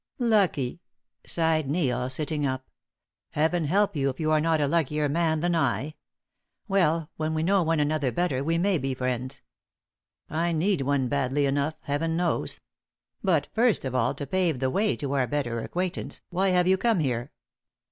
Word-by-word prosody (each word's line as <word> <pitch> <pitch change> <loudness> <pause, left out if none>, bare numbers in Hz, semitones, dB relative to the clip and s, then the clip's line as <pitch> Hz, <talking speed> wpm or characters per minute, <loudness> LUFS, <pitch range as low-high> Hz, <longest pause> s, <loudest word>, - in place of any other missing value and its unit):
"Lucky!" 190 - +1 0.5
sighed 160 -4 +1
Neil, 130 -6 0
sitting 150 +2 -1
up. 130 -1 -2 0.7
"Heaven 160 +2 +1
help 195 +5 +2
you 135 -2 +1
if 130 - -6
you 155 -1 0
are 155 -1 +3
not 160 0 +2
a 145 - +2
luckier 150 -1 +1
man 160 +1 +1
than 175 0 +1
I. 140 0 0 0.7
Well, 165 -5 +1
when 155 0 -1
we 155 - 0
know 195 +3 +3
one 165 -1 +1
another 145 -3 +1
better 135 -1 0
we 165 +3 +1
may 185 0 +2
be 135 -1 -2
friends. 130 +1 -3 0.8
I 170 +2 -1
need 175 +1 +1
one 135 -1 +1
badly 140 +1 0
enough, 140 +3 0
Heaven 160 +3 -1
knows. 175 0 0 0.6
But, 165 -7 +2
first 225 - +2
of 130 - -3
all, 125 -2 +1
to 140 - -5
pave 175 0 0
the 130 +1 0
way 205 +5 +1
to 140 -3 -4
our 130 -3 +1
better 125 -5 -2
acquaintance, 180 +8 -4
why 190 +2 +1
have 180 -1 +3
you 190 0 +3
come 230 -4 +2
here?" 125 -3 -1
155 Hz, 175 wpm, -26 LUFS, 135-175 Hz, 0.8 s, are